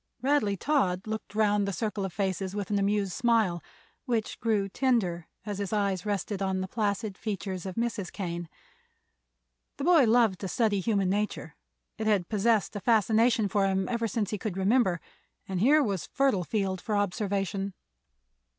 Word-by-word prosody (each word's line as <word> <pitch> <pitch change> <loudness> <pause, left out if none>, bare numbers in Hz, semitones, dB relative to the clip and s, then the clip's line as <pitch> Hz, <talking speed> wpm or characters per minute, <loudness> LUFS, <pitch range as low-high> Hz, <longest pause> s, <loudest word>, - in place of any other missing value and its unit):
Radley 255 -8 +2
Todd 190 -10 +1
looked 215 -1 -5
round 210 -2 +2
the - - 0
circle 205 +1 -2
of 190 - -4
faces 190 0 -2
with 205 -1 -3
an 205 - +2
amused 200 -1 +1
smile, 225 -8 +2 0.4
which 230 -3 -2
grew 215 -4 +1
tender 195 - 0 0.2
as 205 -2 -4
his 200 -2 -3
eye 200 -2 +1
rested 205 -1 -2
upon 190 -1 0
the 185 - -3
placid 210 -1 -2
features 195 -4 -4
of 185 - -6
Mrs. 230 -5 -2
Kane. 175 -3 -4 1.3
The - - -4
boy 330 -4 +6
loved 225 -4 +3
to 195 - -4
study 210 0 +1
human 195 -2 +1
nature; 210 +1 -2 0.4
it 220 - -1
had 200 -5 +2
possessed 220 0 +1
a - - -2
fascination 225 +1 +3
for 195 0 +1
him 190 0 0
ever 235 -1 0
since 210 -1 -2
he 210 - -2
could 195 -1 -4
remember, 195 -2 +2 0.5
and 190 -2 -2
here 290 +9 +5
was 195 - -2
a - - -39
fertile 270 -10 +2
field 190 -1 -1
for 215 - -2
observation. 200 -1 -1
205 Hz, 170 wpm, -28 LUFS, 190-225 Hz, 1.3 s, boy